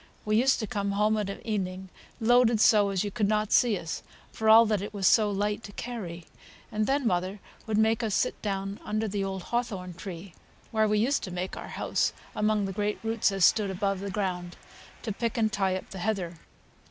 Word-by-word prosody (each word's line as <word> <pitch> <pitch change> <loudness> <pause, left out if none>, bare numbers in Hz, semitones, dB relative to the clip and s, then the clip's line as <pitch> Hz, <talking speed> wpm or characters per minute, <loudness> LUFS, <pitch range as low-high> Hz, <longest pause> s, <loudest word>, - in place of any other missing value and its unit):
We 215 0 +1
used 255 +4 +4
to - - -1
come 200 -1 -2
home 210 +2 +2
of 210 -2 -2
an 195 - -7
evening 190 -3 -3 0.3
loaded 235 -1 +4
so 210 -2 +5
as 195 -1 0
you 205 - -3
could 210 -1 0
not 215 0 0
see 235 -5 +4
us, 165 -2 -5 0.3
for 220 0 0
all 225 +1 +9
that 210 -3 0
it 205 +1 -6
was 195 -2 -1
so 215 0 +5
light 205 +2 -1
to 205 - -9
carry. 190 -10 -6 0.5
And 215 0 0
then 275 0 +1
mother 185 0 0 0.3
would 215 -1 0
make 220 +2 +3
us 220 -4 0
sit - - 0
down 195 -1 -3
under 215 +1 -1
the 200 -1 -2
old 190 -1 -4
hawthorn 195 -7 -2
tree 175 0 -8 0.4
(where 220 -1 +2
we 210 0 +2
used 250 +7 +2
to - - -7
make 180 +1 -4
our - - -7
house - - -1 0.2
among 210 -1 +1
the 195 - -4
great 210 +1 -1
roots 225 -2 +1
as 195 -3 +4
stood 210 -3 +3
above 195 0 -1
th' 200 0 -4
ground), 180 -3 -3 0.5
to 225 - -2
pick 230 +3 -2
and 220 -2 +1
tie 190 -2 +1
up 185 - -7
the 190 - -7
heather. 180 -4 -2
205 Hz, 215 wpm, -28 LUFS, 190-220 Hz, 0.5 s, all